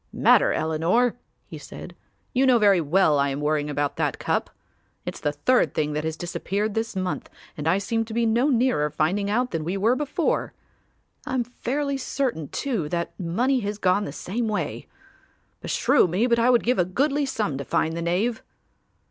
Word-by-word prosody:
"Matter, - - +4
Eleanor," 165 +10 +1 0.3
he - - -9
said, - - -10 0.4
"you 265 +1 +3
know 250 -2 +6
very 200 -5 +4
well 155 -1 +3
I 140 0 +2
am 135 +1 -3
worrying 150 0 0
about 145 -1 -2
that - - 0
cup. - - -1 0.6
It's - - -5
the 145 - 0
third 195 +13 +1
thing 150 -1 0
that 150 +1 -2
has 160 0 -3
disappeared 200 +4 -2
this 225 0 -2
month 185 -1 -3 0.3
and 150 +1 -4
I 170 +4 +3
seem 225 +3 -1
to 225 - -8
be 235 0 +2
no 235 +5 +2
nearer 245 - +2
finding 180 +7 0
out 245 +4 0
than 165 -2 -2
we 180 +5 -2
were 225 +6 +3
before. 295 +1 -1 0.7
I - - -2
am 250 - +1
fairly 275 +4 -3
certain 255 - -2
too 215 - -2
that 170 0 -2
money 240 +10 +1
has 205 -2 -3
gone 200 +1 +2
the - - -5
same 220 +10 -3
way. 215 -1 -3 0.7
Beshrew - - +3
me 185 +7 +1
but 235 -1 +2
I 235 +2 +4
would 245 -2 +4
give 245 -3 +1
a - - +5
goodly 275 - 0
sum 205 - -2
to - - -3
find 160 +3 0
the 170 - -3
knave." 195 +8 0
200 Hz, 190 wpm, -24 LUFS, 160-245 Hz, 0.7 s, know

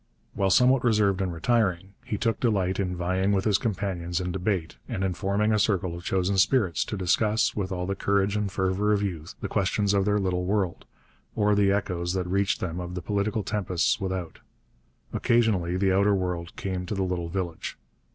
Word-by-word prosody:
While 95 -1 +1
somewhat 125 +6 +4
reserved 105 -5 +2
and 95 -2 -1
retiring, 95 0 0
he 110 -4 -3
took 115 +1 0
delight 95 -6 +1
in 90 -2 -1
vying 95 +3 0
with 95 -1 0
his 105 -2 +3
companions 95 -5 -2
in 90 -1 -3
debate 95 -2 -2
and 95 - -2
in 95 -1 0
forming 105 +3 0
a 105 - +2
circle 95 -4 +1
of 85 - -9
chosen 95 +1 +1
spirits 95 - +2
to 105 - -4
discuss, 110 +5 +1
with 95 -2 -2
all 90 -1 -2
the 100 - -1
courage 100 +1 +1
and 105 -2 -1
fervour 95 +3 +1
of 105 0 +1
youth, 85 -4 -4
the - - -2
questions 100 0 +1
of 100 -1 +2
their 105 0 +2
little 90 -3 0
world, 95 -2 -1 0.5
or 105 -1 +3
the 100 -1 +3
echoes 90 -3 -1
that 95 -1 -1
reached 100 +2 0
them 90 -1 -3
of 90 0 -5
the 90 - -5
political 105 +1 -1
tempests 95 -3 0
without. 95 -3 -4 0.7
Occasionally 110 -8 +2
the 95 0 +2
outer 100 +1 +4
world 90 -2 -3
came 90 -2 -4
to 105 - -3
the 95 - 0
little 90 -2 -2
village. 85 -2 -4
95 Hz, 195 wpm, -26 LUFS, 90-105 Hz, 0.7 s, somewhat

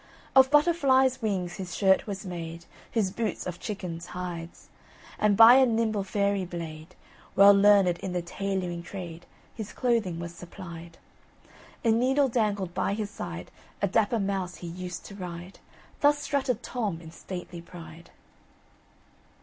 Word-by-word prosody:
Of 265 0 +7
Butterfly's 270 -4 +4
wings 190 -5 -2
his 185 -3 -6
shirt 190 0 +3
was 200 0 -5
made, 170 -2 -6 0.2
His 210 -5 0
boots 225 +2 -3
of 175 -1 -5
chicken's 180 -6 -5
hide; 175 -2 -5 0.7
And 210 -2 +3
by 225 +2 +10
a 265 - +6
nimble 220 -3 0
fairy 200 0 0
blade, 165 -1 -7 0.4
Well 200 +1 +8
learned 200 -3 +5
in 190 - -4
the 180 -1 -2
tailoring 180 -1 -3
trade, 175 -2 -8 0.3
His 220 -3 -7
clothing 225 -9 0
was 170 0 -6
supplied. 170 -1 -10 0.9
A 225 - +5
needle 265 +4 +3
dangled 205 -6 0
by 195 - 0
his 210 -1 -4
side; - - -7 0.3
A 200 - +1
dapper 220 +3 +2
mouse 195 -3 -2
he 175 - -8
used 180 +1 -6
to - - -10
ride, 180 -1 -8 0.4
Thus 290 0 +4
strutted 280 -3 -1
Tom 210 -9 -3
in 160 -1 -11
stately 175 -1 -8
pride! 170 -1 -12
195 Hz, 145 wpm, -27 LUFS, 175-220 Hz, 0.9 s, by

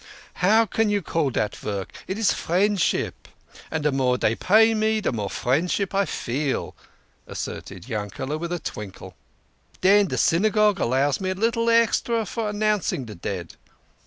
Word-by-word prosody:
How 220 +5 +5
can 220 +1 0
you 205 -2 0
call 160 -4 0
that 105 -4 -1
vork? 100 -2 -5
It 190 - -3
is 220 -2 +2
friendship. 195 +2 0 0.4
And 155 -2 -3
the 150 - +3
more 130 -2 +1
dey 110 - +1
pay 220 - +4
me 220 0 +1
de 215 - -1
more 105 -5 -3
friendship 175 +10 0
I 200 0 +2
feel," 140 -2 -3 0.5
asserted 95 +2 -7
Yankele 115 +6 -4
with 170 +1 -4
a 175 - 0
twinkle. 105 - -8 0.3
" 75 +6 -32
Den 200 +2 +5
de - - -3
Synagogue 210 +3 +3
allows 135 +6 +1
me 190 - -1
a 185 - -1
little 230 +3 +1
extra 230 0 +2
for 220 +2 -3
announcing 210 -9 0
de 110 - -8
dead." 85 -1 -6
180 Hz, 160 wpm, -24 LUFS, 125-210 Hz, 0.5 s, How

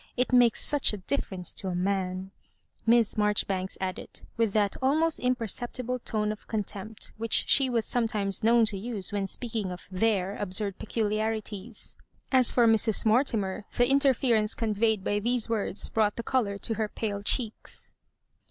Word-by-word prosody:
It 250 +1 0
makes 245 -2 +5
such 290 -6 +1
a - - -3
difference 185 -4 -3
to 190 - -4
a 180 - -2
man," 185 0 -2 0.6
Miss 230 -2 +4
Marjoribanks 200 -2 0
added, 185 -1 -5
with 230 -2 +1
that 205 -2 +1
al 265 +2 +3
most 325 0 +1
imperceptible 250 +1 -1
tone 215 -2 -1
of 215 - -9
contempt 210 0 -4
which 225 0 +2
she 270 -2 +4
was 230 -3 0
sometimes 215 -5 -1
known 230 0 +5
to 200 -2 +1
use 210 -3 -1
when 200 -1 -1
speaking 220 -2 -3
of 180 - -9
Their 195 0 0
absurd 200 0 -2
peculiarities. 215 0 -3 0.3
As 260 -3 +5
for 240 - +4
Mrs. 220 -1 +2
Mortimer, 220 -4 +1
the 245 - +5
inference 260 -5 +2
conveyed 220 -2 0
by 205 +1 0
these 240 +2 0
words 215 -3 -1
broug^ht 215 -2 +1
the 235 - -5
colour 215 -5 0
to 225 +3 -1
her 220 0 -1
pale 205 -2 -3
cheeks. 220 +1 -4
220 Hz, 160 wpm, -28 LUFS, 200-235 Hz, 0.6 s, makes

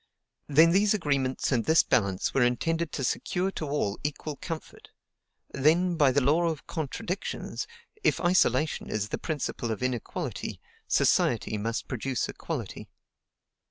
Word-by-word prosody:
Then 160 +3 +6
these 200 +3 +4
agreements 140 -9 0
and 120 -4 +2
this 160 +1 +5
balance 100 -6 +1
were 135 - +2
intended 165 +7 +1
to 135 - -2
secure 180 +8 -1
to 155 - -4
all 140 -8 -1
equal 150 +1 -3
comfort; 165 -4 -7 0.6
then, 170 +6 +3
by 145 -5 +4
the 140 +2 +2
law 155 +6 +3
of 160 -3 -3
contradictions, 170 +4 -4 0.4
if - - +3
isolation 160 -5 +2
is 105 -1 -2
the - - -3
principle 145 -6 -3
of 110 +2 -3
inequality, 125 -3 -3 0.3
society - - +2
must 115 +2 -2
produce 130 +1 -2
equality. - - -5
145 Hz, 135 wpm, -28 LUFS, 125-165 Hz, 0.6 s, Then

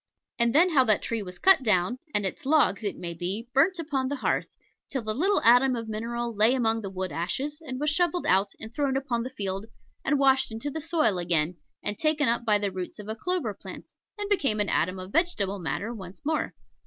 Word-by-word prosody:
And 235 0 +4
then 350 +4 +5
how 275 -5 +5
that 215 -3 +2
tree 230 -2 -2
was 180 -2 -8
cut 385 -6 +6
down, 215 +1 +2
and 205 -5 0
its 190 - -4
logs, 265 -9 +3
it 205 - -2
may 170 -1 -5
be, 185 +7 -4
burnt 330 +8 +3
upon 285 -5 -2
the 285 - -2
hearth, 260 - -1 0.4
till 265 -4 -3
the 215 0 -2
little 385 - +2
atom 245 +2 +6
of 230 -1 -5
mineral 235 +2 -3
lay 220 +5 +4
among 225 -3 +1
the 200 - -5
wood 185 -2 -4
ashes, 265 - -3
and 260 -4 -5
was 300 0 +1
shovelled 350 +1 +1
out 195 +2 +2
and 220 +1 -9
thrown 275 -1 0
upon 250 -3 -1
the 250 - -4
field 200 -4 -4 0.4
and 290 +1 +2
washed 265 -2 +3
into 225 +6 -4
the 320 - -4
soil 310 - +1
again, 170 -1 +1 0.3
and 205 -1 -2
taken 310 -2 +2
up 235 +1 +1
by 210 -2 +4
the 205 -1 -2
roots 185 -1 -6
of 210 0 -9
a 220 - -3
clover 310 - -2
plant, 200 - -11 0.3
and 410 -1 -3
became 275 - +2
an 205 - 0
atom 185 +4 +1
of 185 +1 -8
vegetable 205 - 0
matter 170 +8 -3
once 190 -4 -9
more. 315 0 -1
230 Hz, 225 wpm, -27 LUFS, 195-280 Hz, 0.4 s, cut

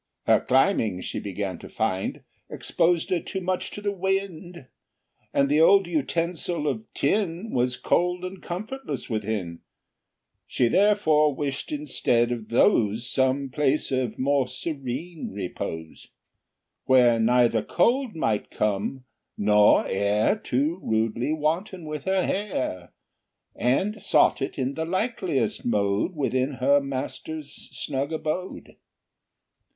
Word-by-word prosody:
Her - - +4
climbing, 125 - +2
she - - -4
began 95 -3 -4
to - - -11
find, 105 -4 -2 0.3
Exposed 170 0 0
her 180 - +2
too 190 - -5
much 185 0 -2
to 205 - -8
the 205 0 -1
wind, 190 -4 -3 0.7
And 140 - +2
the 150 +3 +3
old 195 +3 +6
utensil 165 0 -1
of 215 +7 -3
tin 200 0 0
Was 125 0 0
cold 180 +1 0
and 185 0 -7
comfortless 190 - -5
within: 105 -6 -3 0.9
She 120 -2 +1
therefore 160 - +3
wished, 140 - -3
instead 125 - +1
of 115 -3 -4
those, 115 - +3
Some 130 +1 +1
place 145 +2 0
of 130 -4 -1
more 135 0 +1
serene 140 +4 -5
repose, 80 -4 -6 0.8
Where 125 -3 +5
neither 115 0 +3
cold 240 - +1
might 110 -9 -1
come, 105 +5 -2 0.3
nor 105 0 +5
air 100 - +1
Too 155 - -1
rudely 110 +5 0
wanton 165 +4 -2
in 150 -1 -5
her 190 +3 +1
hair, 130 - -3 0.6
And 190 - 0
sought 195 - +3
it 135 - -3
in 130 0 -1
the 160 - -3
likeliest 185 - -1
mode 105 - 0
Within 135 -1 0
her 140 +2 +3
master's 140 +2 -5
snug 140 +1 -4
abode. 160 +4 -4
140 Hz, 125 wpm, -25 LUFS, 120-180 Hz, 0.9 s, old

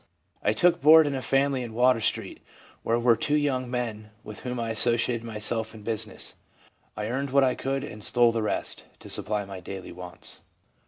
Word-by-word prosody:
I 105 - +2
took 170 +9 +3
board 155 +2 +8
in 145 - -1
a 135 - -3
fam 135 +2 +2
ily 130 -2 -2
in 115 -2 -7
Water 125 -1 +4
street, 110 -2 -1 0.4
where 115 - +1
were 120 0 +4
two 145 +6 0
young 135 -4 0
men 115 -4 -4
with 110 - -9
whom 125 -1 -4
I 115 -1 -2
associated 115 +1 +2
myself 110 0 -2
in 105 - -12
busi 110 0 -2
ness. - - -6 0.6
I 105 - -3
earned 135 +5 -2
what 140 +1 +4
I 130 -1 +3
could, 135 +1 -3
and 105 -7 -8
stole 120 +1 +4
the 115 -1 -1
rest, 110 - -1 0.2
to - - -8
supply 105 -1 +1
my 95 -1 -8
daily 95 +1 -8
wants. 90 0 -8
115 Hz, 205 wpm, -26 LUFS, 110-130 Hz, 0.6 s, board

